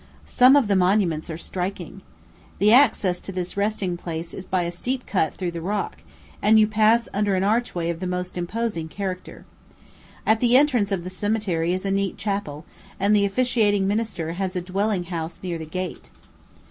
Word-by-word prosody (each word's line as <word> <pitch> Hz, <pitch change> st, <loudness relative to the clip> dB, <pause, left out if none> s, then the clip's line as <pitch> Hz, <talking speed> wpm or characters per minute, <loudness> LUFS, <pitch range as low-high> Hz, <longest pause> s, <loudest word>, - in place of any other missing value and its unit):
Some 255 Hz, +2 st, +6 dB
of 280 Hz, -6 st, +4 dB
the 200 Hz, -, +2 dB
monuments 180 Hz, -4 st, +2 dB
are 160 Hz, -, -4 dB
striking. 185 Hz, +1 st, -5 dB, 0.6 s
The 210 Hz, +2 st, +4 dB
access 205 Hz, -9 st, +4 dB
to -, -, -7 dB
this 180 Hz, -1 st, -4 dB
resting 200 Hz, -3 st, -1 dB
place 165 Hz, -1 st, -6 dB
is 190 Hz, -, -8 dB
by 185 Hz, -1 st, 0 dB
a 170 Hz, -, -3 dB
steep 250 Hz, +9 st, -3 dB
cut 180 Hz, -6 st, 0 dB
through 180 Hz, -2 st, -3 dB
the 170 Hz, -1 st, -6 dB
rock, 200 Hz, +4 st, -2 dB, 0.4 s
and 220 Hz, +1 st, +5 dB
you 215 Hz, -, +6 dB
pass 220 Hz, +2 st, +3 dB
under 205 Hz, -1 st, +1 dB
an 185 Hz, -, +1 dB
archway 205 Hz, -5 st, 0 dB
of 165 Hz, -, -6 dB
the 185 Hz, -, -3 dB
most 180 Hz, 0 st, -3 dB
imposing 180 Hz, -1 st, -3 dB
character. 185 Hz, +1 st, -6 dB, 0.8 s
At 220 Hz, 0 st, +3 dB
the 245 Hz, +1 st, +5 dB
entrance 250 Hz, -8 st, +2 dB
of 190 Hz, -3 st, -1 dB
the 185 Hz, -, -6 dB
cemetery 185 Hz, -4 st, -1 dB
is 185 Hz, +2 st, -2 dB
a 195 Hz, -, 0 dB
neat 195 Hz, 0 st, -1 dB
chapel, 195 Hz, -7 st, -3 dB, 0.3 s
and 200 Hz, +2 st, +3 dB
the 200 Hz, -1 st, +4 dB
officiating 205 Hz, -2 st, +2 dB
minister 205 Hz, -6 st, -2 dB
has 185 Hz, +2 st, -3 dB
a 180 Hz, -, -1 dB
dwelling 195 Hz, +1 st, -1 dB
house 170 Hz, -2 st, -5 dB
near 175 Hz, -3 st, -3 dB
the 160 Hz, -, -7 dB
gate. 185 Hz, +2 st, -5 dB
195 Hz, 185 wpm, -23 LUFS, 175-215 Hz, 0.8 s, Some